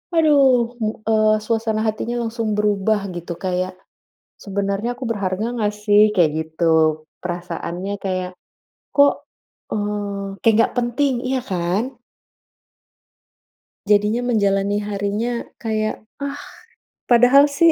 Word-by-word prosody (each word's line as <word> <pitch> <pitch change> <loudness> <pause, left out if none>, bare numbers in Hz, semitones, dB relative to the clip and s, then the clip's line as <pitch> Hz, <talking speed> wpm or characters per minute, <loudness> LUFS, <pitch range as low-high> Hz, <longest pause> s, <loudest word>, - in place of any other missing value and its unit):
aduh 270 -7 +4
mu 215 0 +1 0.2
eee, 215 -1 +4
suasana 225 -1 0
hatinya 225 +2 -2
langsung 225 -2 -2
berubah 210 0 +1
gitu, 170 0 -5
kayak 185 0 -2 0.7
sebenarnya 200 +3 -2
aku 260 - -8
berharga 200 0 -2
nggak 210 -1 0
sih? 205 0 +5
Kayak 165 -4 +4
gitu. 160 -1 +2 0.2
Perasaannya 175 +2 -4
kayak, 185 -1 -2 0.6
kok, 285 0 +6 0.6
eee, 205 -1 -3 0.2
kayak 225 -2 +5
nggak 230 - +2
penting, 250 +3 +1
iya 265 0 0
kan? 195 +8 -2 1.9
Jadinya 210 +3 +2
menjalani 200 -3 +1
harinya 210 +3 -2 0.2
kayak, 215 -1 -2 0.2
ah, 280 +1 -4 0.7
padahal 250 +4 +6
sih, 330 +3 +4
210 Hz, 110 wpm, -21 LUFS, 195-235 Hz, 1.9 s, kok